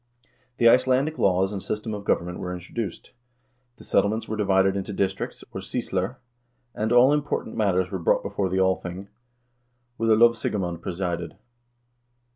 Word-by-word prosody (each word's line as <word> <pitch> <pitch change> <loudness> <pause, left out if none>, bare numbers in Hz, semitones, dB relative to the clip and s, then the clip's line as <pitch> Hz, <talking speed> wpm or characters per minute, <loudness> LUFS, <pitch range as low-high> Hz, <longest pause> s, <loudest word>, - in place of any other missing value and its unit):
The 115 - +5
Icelandic 130 +5 +3
laws 95 +1 +2
and 100 - -4
system 105 +2 -4
of 100 -1 -6
government 90 -1 0
were 90 0 -4
introduced. 90 +2 -6 0.7
The - - -14
settle 100 +1 +2
ments 110 +1 -3
were 110 - -3
divided 95 -2 +2
into 100 +1 -4
districts, 95 0 -2
or - - -6
sysler, 95 +6 -2 0.6
and 110 +1 -2
all 125 +4 +6
important 145 -6 -2
matters 95 -3 +1
were 95 - -3
brought 85 - +2
before 95 -2 -2
the 95 - -1
Althing, 95 0 -1 0.9
where 115 0 0
the 110 - +6
lovsigemand 105 -7 +2
presided. 85 -2 -3
100 Hz, 150 wpm, -25 LUFS, 95-110 Hz, 0.9 s, all